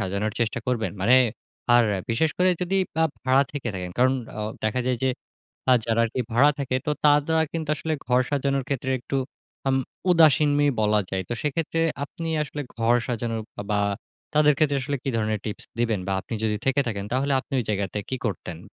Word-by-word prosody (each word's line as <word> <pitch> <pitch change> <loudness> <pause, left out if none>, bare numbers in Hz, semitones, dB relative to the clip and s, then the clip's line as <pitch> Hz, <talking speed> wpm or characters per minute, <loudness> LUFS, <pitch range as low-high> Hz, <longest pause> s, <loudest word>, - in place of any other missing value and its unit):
সাজানোর 100 +3 -1
চেষ্টা 115 +1 0
করবেন? 120 -5 0
মানে 120 +7 +5 0.6
আর 120 -1 +6 0.3
বিশেষ 155 +8 +2
করে 185 0 +4
যদি 190 +2 0 0.3
আ - - +5 0.2
ভাড়া 130 +1 +4
থেকে 140 -4 -3
থাকেন। 90 -1 -4
কারণ 130 +1 +5 0.3
অ - - -2 0.2
দেখা 110 +4 +1
যায় 125 -2 0
যে - - +3 0.6
আ - - +8
যারা 115 0 +1
আরকি 115 +3 -4
ভাড়া 140 +5 +6
থাকে 130 -2 -1
তো 150 - +1
তারা 150 +2 +4
কিন্তু 160 -2 -4
আসলে 160 +1 -2
ঘর 125 0 +3
সাজানোর 140 -1 0
ক্ষেত্রে 130 -1 -2
একটু 130 +3 -5 0.5
আম 135 - +3 0.3
উদাসীনই 150 -3 +5
বলা 105 0 +3
যায়। 95 -1 -2
তো - - -1
সেক্ষেত্রে 160 +2 -1 0.2
আপনি 165 +3 -6 0.2
আসলে 150 0 -5
ঘর 115 +1 +3
সাজানো 115 -1 -2 0.3
আ - - -6
বা 105 - +2 0.5
তাদের 150 0 +5
ক্ষেত্রে 145 -2 +2
আসলে 140 +1 -2
কি 135 - -1
ধরনের 110 -1 0
টিপস 105 - -5
দিবেন 115 -4 +1
বা 95 - 0
আপনি - - -8
যদি 105 -1 +1
থেকে 135 +1 +2
থাকেন 100 -3 -3
তাহলে 140 +2 +1
আপনি 130 - -10
ওই - - -1
জায়গাতে 100 -1 -1
কি 130 - -1
করতেন? 90 -5 -4
130 Hz, 190 wpm, -25 LUFS, 110-145 Hz, 0.6 s, আ